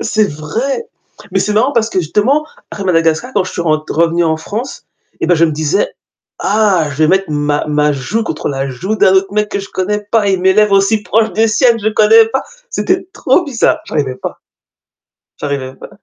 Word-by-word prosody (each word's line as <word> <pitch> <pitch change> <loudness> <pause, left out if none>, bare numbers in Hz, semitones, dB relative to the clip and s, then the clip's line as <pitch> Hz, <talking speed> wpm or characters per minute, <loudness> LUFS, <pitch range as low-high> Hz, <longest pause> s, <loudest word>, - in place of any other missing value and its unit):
C'est 215 -1 +1
vrai. 225 - -3 0.5
Mais - - +1
c'est 210 - 0
marrant 245 +7 +2
parce 230 -3 +1
que 185 - 0
justement, 255 - +1 0.2
à 200 - -6
Madagascar, 165 +6 +1
quand 195 -3 +2
je - - -7
suis 170 - -3
rentr 155 -2 -1
revenue 170 +1 +2
en 160 -1 +1
France, 215 +11 -6 0.4
eh - - 0
bah 175 - +4
je 165 - +4
me 160 - 0
disais: 155 +6 -1 0.5
«Ah 195 -6 +2
je 135 - -7
vais 155 0 +3
mettre 190 -3 +1
ma 145 0 0
ma 150 0 +1
joue 210 +12 -2
contre - - -3
la 135 -1 -2
joue 185 +12 -3
d'un 190 -3 +4
autre 190 +1 +2
mec 210 0 0
que 200 - -2
je 195 - -9
connais 210 +3 -1
pas 220 -3 +2
et 190 - +2
mes 190 +1 +3
lèvres 210 -1 +4
aussi 205 +2 +2
proches 220 +1 +1
des 225 +1 +2
siennes, 235 +1 +3
je 215 - 0
connais 220 +1 +5
pas. 265 +4 -2 0.3
C'était 370 -5 0
trop 355 -3 +1
bizarre». 275 -7 +1
J'arrivais 140 -4 -2
pas. - - -7 1.0
J'arrivais 140 -2 -4
pas. - - -12
195 Hz, 210 wpm, -14 LUFS, 155-220 Hz, 1.0 s, connais